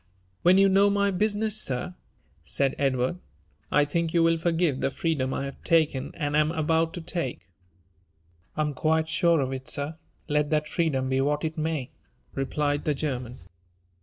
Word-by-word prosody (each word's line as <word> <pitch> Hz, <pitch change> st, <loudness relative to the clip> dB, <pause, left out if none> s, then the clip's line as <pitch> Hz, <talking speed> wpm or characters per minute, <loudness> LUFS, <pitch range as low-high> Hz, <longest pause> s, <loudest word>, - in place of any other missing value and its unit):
When 180 Hz, +2 st, +5 dB
you 195 Hz, 0 st, +6 dB
know 195 Hz, +1 st, +4 dB
my 200 Hz, 0 st, +2 dB
business, 215 Hz, +2 st, +1 dB
sir," 130 Hz, +7 st, -3 dB, 0.5 s
said 135 Hz, -, 0 dB
Edward, 135 Hz, +4 st, 0 dB, 0.5 s
I 145 Hz, -, +4 dB
think 165 Hz, +3 st, -1 dB
you 170 Hz, -, +5 dB
will 165 Hz, 0 st, +3 dB
forgive 165 Hz, -4 st, +1 dB
the -, -, +1 dB
freedom 140 Hz, -3 st, -1 dB
I 135 Hz, -, -2 dB
have 140 Hz, -, -9 dB
taken, 155 Hz, -5 st, +2 dB
and 145 Hz, -3 st, -2 dB
am 155 Hz, 0 st, +3 dB
about 160 Hz, 0 st, +1 dB
to 175 Hz, -, -5 dB
take." 165 Hz, -, -4 dB, 1.1 s
I -, -, +1 dB
am 150 Hz, -1 st, 0 dB
quite 160 Hz, +2 st, +1 dB
sure 170 Hz, 0 st, +2 dB
of 135 Hz, 0 st, -2 dB
it, 130 Hz, +1 st, -6 dB
sir, 150 Hz, +2 st, -2 dB, 0.3 s
let 150 Hz, -1 st, +1 dB
that 150 Hz, -1 st, +1 dB
freedom 150 Hz, -6 st, 0 dB
be 130 Hz, 0 st, +1 dB
what 145 Hz, +2 st, 0 dB
it 160 Hz, 0 st, -3 dB
may," 155 Hz, -4 st, -2 dB, 0.4 s
replied 145 Hz, +1 st, -1 dB
the 150 Hz, -, +1 dB
German. 125 Hz, -4 st, -3 dB
155 Hz, 170 wpm, -26 LUFS, 140-170 Hz, 1.1 s, you